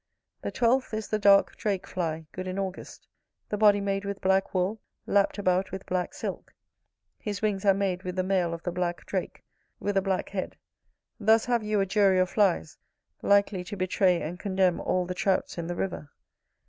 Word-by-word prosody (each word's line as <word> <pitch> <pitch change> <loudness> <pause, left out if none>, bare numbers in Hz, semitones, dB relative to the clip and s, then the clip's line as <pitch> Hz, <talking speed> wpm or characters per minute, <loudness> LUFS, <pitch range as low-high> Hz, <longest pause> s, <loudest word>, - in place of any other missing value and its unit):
The - - -3
twelfth 245 -1 +1
is 215 -1 -4
the 215 - 0
dark 200 -1 +5
drake 200 -3 -1
fly, 165 -3 -3
good 185 0 -6
in 185 +1 -4
August: 190 -1 -5 0.4
the - - -1
body 205 -1 +5
made 195 0 -1
with 200 0 -4
black 190 0 +2
wool, 190 +4 -1 0.2
lapt 200 +1 +2
about 185 -1 +1
with 190 0 -6
black 180 -1 -2
silk; - - -6 0.6
his 205 -1 -5
wings 205 -2 0
are 195 - +6
made 190 -2 -1
with 180 -1 -5
the 185 - 0
mail 185 -2 +1
of 170 0 -6
the 175 - -2
black 175 0 -2
drake, - - -4 0.4
with 205 0 -2
a 195 - +4
black 190 -1 -1
head. 190 -2 -4 0.6
Thus 220 +1 +4
have 240 -1 +1
you 210 -1 0
a - - +2
jury 195 -1 +3
of 185 0 +2
flies, 190 - +1 0.4
likely 200 -2 +3
to 205 +3 -7
betray 185 -1 +2
and 175 +3 -5
condemn 190 -3 +1
all 185 -1 0
the 180 - -3
Trouts 185 -1 0
in 165 - -4
the 175 - -3
river. 175 -5 -4
195 Hz, 195 wpm, -27 LUFS, 180-205 Hz, 0.6 s, are